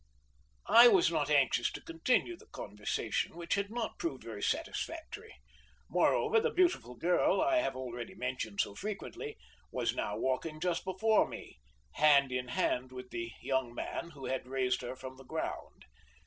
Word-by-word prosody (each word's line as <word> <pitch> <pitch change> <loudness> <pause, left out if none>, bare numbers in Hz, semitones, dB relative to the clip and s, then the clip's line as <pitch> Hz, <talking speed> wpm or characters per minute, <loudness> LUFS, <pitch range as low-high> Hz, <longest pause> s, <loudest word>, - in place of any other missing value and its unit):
I 235 +2 +9
was 190 -7 +5
not 150 -3 0
anxious 135 -4 +3
to - - -5
continue 250 - 0
the 435 +5 -18
conversation, - - -3
which 170 0 -2
had 200 0 0
not 230 0 -4
proved 140 -6 -3
very 110 -3 -7
satisfactory; - - -3 0.6
moreover, 435 - +3
the 475 +2 +1
beautiful 355 - +1
girl 175 +7 +2
I 330 0 +3
have 315 - 0
already 120 -2 -6
mentioned 125 -5 -2
so 100 - -3
frequently, 215 - -6 0.3
was - - 0
now - - -2
walking 155 +4 -1
just 175 0 -1
before 210 +4 +3
me, - - -10 0.3
hand 140 -3 +5
in 125 0 -2
hand 125 +1 0
with 125 0 -9
the 115 0 -4
young 130 -3 -1
man 170 - -4
who 135 - -8
had 130 -1 -2
raised 130 -1 0
her 125 +1 -5
from 130 0 -9
the 135 - -12
ground. - - -5
145 Hz, 160 wpm, -32 LUFS, 125-210 Hz, 0.6 s, I